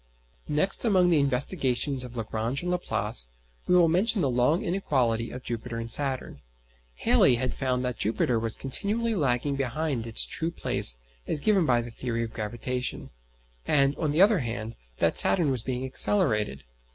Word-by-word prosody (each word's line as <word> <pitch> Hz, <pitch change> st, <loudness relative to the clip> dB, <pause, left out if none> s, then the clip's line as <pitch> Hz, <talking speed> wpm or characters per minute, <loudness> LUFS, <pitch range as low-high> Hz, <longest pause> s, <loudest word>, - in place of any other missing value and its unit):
Next 155 Hz, +6 st, +3 dB
among 185 Hz, -6 st, +3 dB
the 160 Hz, -, +4 dB
investigations 135 Hz, -1 st, 0 dB
of 125 Hz, -1 st, -9 dB
Lagrange 115 Hz, +5 st, -3 dB
and 180 Hz, -, -2 dB
Laplace 175 Hz, -, -1 dB, 0.4 s
we 180 Hz, -, +3 dB
will 175 Hz, -2 st, +5 dB
mention 195 Hz, +7 st, +1 dB
the 135 Hz, -5 st, +1 dB
long 125 Hz, +7 st, +1 dB
inequality 125 Hz, -11 st, -1 dB
of 125 Hz, -, -9 dB
Jupiter 115 Hz, 0 st, -5 dB
and 115 Hz, 0 st, -3 dB
Saturn. 135 Hz, -, 0 dB, 0.5 s
Halley 125 Hz, -, +4 dB
had 125 Hz, +1 st, -2 dB
found 130 Hz, -1 st, -2 dB
that 125 Hz, -2 st, -4 dB
Jupiter 115 Hz, +2 st, 0 dB
was 115 Hz, 0 st, -2 dB
continually 215 Hz, -, -2 dB
lagging 140 Hz, -, 0 dB
behind 135 Hz, -2 st, -3 dB
its 115 Hz, -, +2 dB
true 165 Hz, -, -2 dB
place -, -, +1 dB, 0.3 s
as -, -, -1 dB
given 190 Hz, -1 st, +2 dB
by 120 Hz, -2 st, +2 dB
the 120 Hz, -, -9 dB
theory 115 Hz, 0 st, -3 dB
of 115 Hz, -, -7 dB
gravitation; 120 Hz, +3 st, -4 dB, 0.6 s
and, 140 Hz, -1 st, +3 dB
on 155 Hz, -3 st, -1 dB
the 160 Hz, +6 st, +5 dB
other 205 Hz, -2 st, +4 dB
hand, 115 Hz, -3 st, -5 dB, 0.2 s
that -, -, +3 dB
Saturn 165 Hz, -7 st, +4 dB
was 130 Hz, -3 st, -1 dB
being 130 Hz, +2 st, -4 dB
accelerated. 115 Hz, -, +2 dB
130 Hz, 165 wpm, -26 LUFS, 115-160 Hz, 0.6 s, will